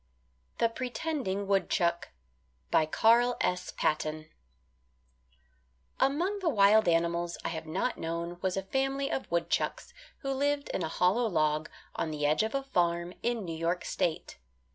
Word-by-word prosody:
THE 230 - +3
PRETENDING 245 -4 -3
WOODCHUCK 180 -3 +1 0.8
CARL 240 +6 +4
S. 180 0 -1
PATTON 155 0 -1 1.7
Among 340 +10 +1
the 365 -4 +1
wild 215 - +5
animals 170 0 +1
I - - 0
have 160 -1 -5
not 190 +10 -1
known 170 +1 -4
was 190 0 -1
a 195 - -1
family 270 +6 -1
of 265 - -3
woodchucks 170 - -1 0.3
who 275 - -2
lived 285 +1 0
in - - -2
a - - -1
hollow 190 +9 +2
log 155 -4 +1 0.3
on 165 - -1
the 150 -1 -2
edge 150 +5 +3
of 220 +4 -1
a 275 - 0
farm 175 -8 0
in 235 -3 -1
New 165 -2 -4
York 170 +2 -1
State. 160 - -2
190 Hz, 140 wpm, -30 LUFS, 170-250 Hz, 1.7 s, wild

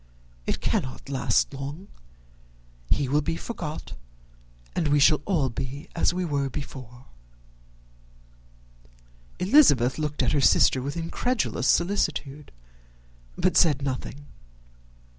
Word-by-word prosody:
It - - -2
cannot 130 +1 -2
last 130 -1 +1
long. 140 +8 -7 1.0
He 140 -2 +1
will 145 +3 +2
be 165 +3 -2
forgot, 160 -9 -6 0.8
and 160 - 0
we 145 0 +3
shall 150 +1 +5
all 160 -9 +1
be 135 +4 -6
as 170 - +2
we 180 +1 -2
were 140 -4 -1
before." 130 -3 -9 2.3
Elizabeth 170 - +4
looked 150 -1 -1
at - - +1
her 145 - +2
sister 130 0 +4
with 140 +5 -4
incredulous 215 +8 -1
solicitude, 155 -6 0 0.9
but 185 - +1
said 145 -5 +4
nothing. 140 +1 -5
145 Hz, 110 wpm, -25 LUFS, 135-165 Hz, 2.3 s, shall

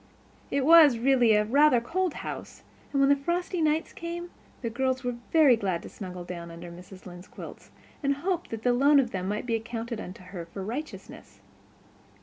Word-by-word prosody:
It 275 -1 0
was 315 -5 +8
really 245 -2 +4
a 210 0 +3
rather 280 +2 +5
cold 350 +8 -2
house; - - -7 0.3
and 275 - 0
when 275 0 +4
the - - +6
frosty 345 +5 -2
nights 310 +1 0
came 345 +1 -6 0.3
the 230 - -1
girls 260 +2 -1
were 245 0 -1 0.2
very 305 -6 +6
glad 190 -6 -2
to - - -9
snuggle 180 -3 -8
down 175 -1 -7
under 170 +1 -9
Mrs. 180 +2 -13
Lynde's 180 0 -11
quilts, - - -11 0.3
and 280 -1 +1
hoped 345 +4 -2
that 225 -1 -6
the 245 - +3
loan 280 +3 +5
of 245 -3 0
them 185 -1 -3
might 210 +3 -2
be 235 - -2
accounted 230 0 -4
unto 185 +1 -9
her 180 -2 -8
for 190 +3 -7
righteousness. 280 +9 -8
245 Hz, 190 wpm, -27 LUFS, 195-295 Hz, 0.3 s, was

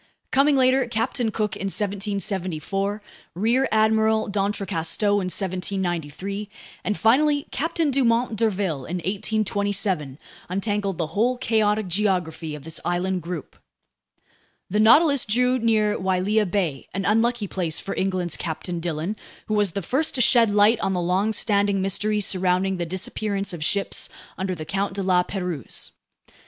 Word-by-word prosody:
Coming 280 +2 +4
later, 260 -1 +3
Captain 230 +1 0
Cook 210 -2 -2
in - - -5
1774, 195 -1 -2 0.3
Rear 235 +8 +2
Admiral 220 0 +3
d'Entrecasteaux 200 -1 0
in 190 - -2
1793, 185 0 -3 0.3
and 210 - -1
finally 285 +5 +3
Captain 325 -1 0
Dumont 240 -3 +2
d'Urville 195 - -1
in 175 - -3
1827, 195 -5 -1 0.3
untangled 195 0 -1
the 160 -2 -3
whole 245 +6 +2
chaotic 215 -3 +1
geography 175 -5 -1
of 150 - -10
this 160 +1 -4
island 180 +1 -1
group. 170 -1 -6 1.2
The 210 - +1
Nautilus 280 +5 +6
drew 250 +4 +2
near 215 -2 +2
Wailea 190 +3 +1
Bay, 170 -8 -1
an 195 0 -2
unlucky 225 0 +2
place 175 -5 -1
for 195 - -5
England's 185 -3 -1
Captain 165 +2 -4
Dillon, 165 +4 -3 0.3
who 215 - -3
was 205 -4 +2
the 200 - -3
first 290 - 0
to 255 - +1
shed 230 -1 +5
light 210 +2 +4
on 190 - 0
the 180 - 0
longstanding 200 +2 +1
mystery 210 +2 0
surrounding 185 0 +1
the 175 -1 -3
disappearance 195 +2 -2
of 165 -3 -4
ships 200 +5 0 0.3
under 190 -1 -2
the 155 -2 -7
Count 195 +3 -2
de 200 - -2
La 185 -1 +3
Pérouse. 180 - -4
200 Hz, 140 wpm, -24 LUFS, 180-220 Hz, 1.2 s, Nautilus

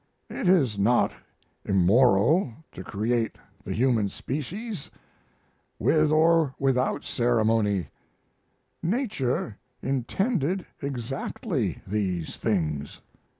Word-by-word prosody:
It - - -2
is 135 - +3
not 120 +5 +3 0.5
immoral 115 - +4 0.2
to 95 - -8
create 110 +4 -1 0.3
the - - -6
human 115 -4 +2
species 165 - -5 0.9
with 155 -1 +3
or 160 -2 +4
without 135 -1 +1
ceremony; 110 -5 +1 0.9
nature 165 - -1 0.2
intended 180 - 0 0.2
exactly 135 - -3
these 95 -5 -2
things." 75 -9 -2
125 Hz, 80 wpm, -26 LUFS, 105-155 Hz, 0.9 s, immoral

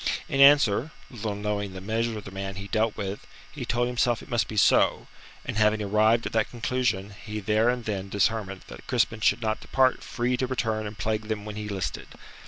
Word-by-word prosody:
In 135 - -2
answer 140 -2 +6 0.2
little 110 -4 -4
knowing 105 -1 -3
the 95 - -7
measure 110 +3 -1
of 105 - -7
the 100 - -9
man 95 0 -5
he 100 +1 -7
dealt 110 0 0
with 100 +1 -5 0.2
he - - -6
told 120 +1 +1
himself 120 -1 0
it - - -14
must 120 -2 +1
be 110 - -6
so, - - +4 0.4
and - - -4
having 110 0 +3
arrived 110 +3 +2
at - - -3
that 110 -1 +1
conclusion, 115 -4 -1
he 105 -1 -5
there 110 +3 +2
and 125 -1 -1
then 100 -2 -3
determined 100 -1 -1
that - - -12
Crispin 115 -3 +1
should 110 +2 +2
not 110 0 -1
depart 130 -1 +2
free 125 +1 -1
to 130 - -1
return 110 -4 -1
and 105 0 -9
plague 110 0 -2
them 105 -2 -3
when 105 -1 -6
he 105 0 -5
listed. 95 -2 -4
110 Hz, 210 wpm, -26 LUFS, 105-120 Hz, 0.4 s, answer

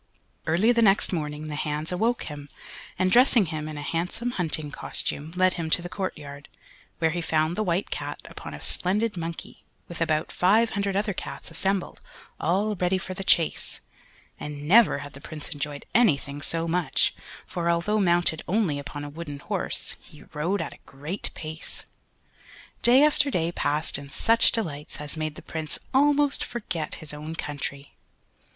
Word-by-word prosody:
Early 185 +9 +4
the 235 -1 +3
next 195 -2 +4
morning 150 -2 -3
the 150 - -4
hands 150 +2 -2
awoke 225 +7 +1
him, 145 -1 -7 0.5
and 185 0 +2
dressing 245 -3 +6
him 155 -2 -4
in 155 - -6
a 145 - -5
handsome 180 +10 -1
hunting 155 -7 -1
costume, 150 +1 -2
led 185 0 +4
him 165 -2 -3
to 175 - +3
the 175 - -5
courtyard, 150 -7 -5 0.5
where 160 -1 +2
he 175 +2 -2
found 160 0 +1
the 215 - 0
White 185 -1 0
Cat - - -4
upon - - -8
a - - -9
splendid 210 +4 +1
monkey, 165 -1 -6 0.2
with 170 -1 -8
about 155 -1 +1
five 215 +6 +4
hundred 200 -1 -1
other 205 +1 +1
cats 175 - -7
assembled, 190 +3 -1 0.4
all 200 +6 +1
ready 185 0 +1
for 185 0 -5
the 195 +1 -5
chase; 170 -4 +2 0.6
and 145 0 -6
never 225 +2 +7
had 145 - -10
the 140 - -11
Prince 150 0 -6
enjoyed 145 0 -5
anything 145 -11 +3
so 165 +2 -1
much, 170 -3 +2 0.3
for 170 -1 -2
although 170 +6 +2
mounted 175 -4 +3
only 180 -7 +1
upon 145 +1 -6
a 145 - -5
wooden 145 -1 -6
horse, - - -2
he 150 - -16
rode 170 +7 0
at - - -6
a - - -16
great 150 +8 -5
pace. 160 +1 -6 1.0
Day 250 +4 +7
after 290 -2 +4
day 170 -8 0
passed 150 -2 0
in 140 0 -10
such 230 +10 +4
delights 150 -10 -3
as 150 +1 -2
made 155 -1 -3
the - - -11
Prince 160 -2 -3 0.2
almost 285 +1 +4
forget 175 -10 -4
his 155 -2 -6
own 155 +2 -6
country. 145 -2 -5
170 Hz, 170 wpm, -26 LUFS, 150-195 Hz, 1.0 s, never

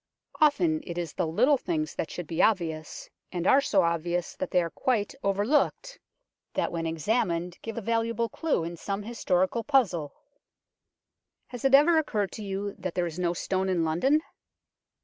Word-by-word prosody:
Often 310 +1 +3
it 170 -1 -5
is 170 -3 -3
the 180 - -1
little 250 - +3
things 310 +2 -2
that - - -3
should 175 - -6
be 160 +1 -1
obvious, 165 -7 0 0.2
and 175 -1 -3
are 270 +8 +6
so 195 -8 +2
obvious 170 +1 -1
that - - -3
they 180 -1 +3
are 165 - -4
quite 225 -1 0
overlooked, 255 - 0 0.6
that - - 0
when 165 -1 -2
examined 175 0 -1
give 225 0 -6
a - - -2
valuable 230 +1 0
clue 295 - -1
in 170 +1 -5
some 200 +4 -4
historical 205 -1 0
puzzle. 190 - +1 1.3
Has 245 -2 -8
it 270 0 +7
ever 320 +3 +6
occurred 210 -10 -1
to 220 - -7
you 200 0 -3
that 185 -2 -4
there 180 - +1
is 170 +1 -5
no 175 -1 +1
stone 190 +2 -1
in 175 -3 +1
London 265 - +2
195 Hz, 170 wpm, -27 LUFS, 170-245 Hz, 1.3 s, it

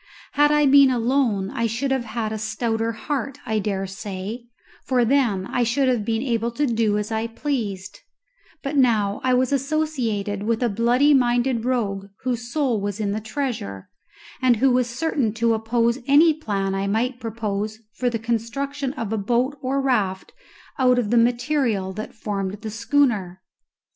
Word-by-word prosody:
Had 295 +1 +4
I 295 0 +4
been 280 0 +7
alone 235 -5 +1
I 230 0 0
should 250 +5 -2
have 265 -3 0
had 220 -1 -3
a 215 - -4
stouter 225 +1 -1
heart, 275 +3 -4
I 220 -1 0
dare 195 -1 -2
say, 195 +4 -6 0.4
for 250 -2 +2
then 230 -7 +2
I 245 - -1
should 245 +3 +2
have 245 -4 +1
been 225 +2 -1
able 235 -3 0
to 290 +5 0
do 225 -4 +1
as 210 +1 -3
I 220 +1 -1
pleased; 225 -7 -4 0.6
but 275 +2 -3
now 220 -7 +2
I 255 -1 +3
was 255 +2 +1
associated 260 -9 -1
with 225 +3 0
a 240 - +2
bloody 240 +7 +3
minded 245 -2 +2
rogue 200 -6 -1 0.2
whose 240 -2 -3
soul 260 -8 0
was 205 +1 -3
in 205 -2 -1
the 215 +2 -2
treasure, 220 - -4 0.5
and 255 -2 +4
who 260 +4 +3
was 250 -1 +2
certain 245 -4 -1
to 230 0 +2
oppose 230 +2 +1
any 310 +4 +6
plan 200 -10 -2
I 195 +1 -1
might 240 +5 0
propose 215 -2 -3 0.2
for 250 0 0
the 235 - -2
construction 255 +5 -2
of 225 -5 -4
a 220 - 0
boat 245 +7 0
or 270 +1 0
raft 205 -8 0 0.5
out 250 -1 +4
of 230 -4 0
the 240 - +4
material 235 -5 +1
that 215 +3 -7
formed 195 -3 -3
the 220 - -5
schooner. 225 -6 0
235 Hz, 175 wpm, -23 LUFS, 215-260 Hz, 0.6 s, been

